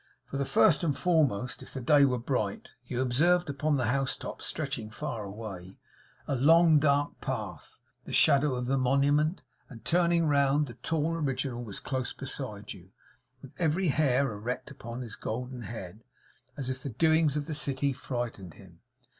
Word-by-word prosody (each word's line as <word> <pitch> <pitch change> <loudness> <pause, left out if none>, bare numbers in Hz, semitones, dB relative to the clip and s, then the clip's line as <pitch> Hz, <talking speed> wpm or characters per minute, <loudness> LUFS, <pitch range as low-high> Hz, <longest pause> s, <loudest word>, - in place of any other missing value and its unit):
For 140 0 -3
first 150 +2 +4
and 150 -5 0
foremost, 140 - +1
if - - -10
the - - -2
day 140 +3 +5
were 125 -2 +1
bright, 115 -4 -2 0.2
you 125 0 -2
observed 170 +6 +2
upon 150 +2 0
the 130 - 0
house 135 +3 0
tops, - - -6
stretching 110 - -3
far 110 0 -5
away, 100 -3 -8 0.5
a - - -1
long 160 +4 +6
dark 145 0 +1
path; - - -5 0.3
the - - -8
shadow 140 -1 +4
of 125 0 -3
the 135 +2 +1
Monument; 145 +6 +2 0.3
and 115 -4 -12
turning 170 -1 +3
round, 140 0 +3
the 120 - -9
tall 155 +6 -1
original 135 -5 -2
was 105 -4 -6
close 130 -2 -3
beside 120 -7 -5
you, 95 0 -15 0.5
with 135 - -11
every 170 +2 +1
hair 140 -3 +2
erect 115 +7 -5
upon 120 -2 -7
his 115 -3 -7
golden 125 +2 -5
head, 110 -2 -8 0.5
as 130 -2 -3
if 130 0 -5
the 140 - -4
doings 160 +3 +3
of 145 - -2
the 155 - -4
city 140 -1 +1
frightened 120 - -5
him. 90 -4 -16
135 Hz, 170 wpm, -29 LUFS, 120-150 Hz, 0.5 s, long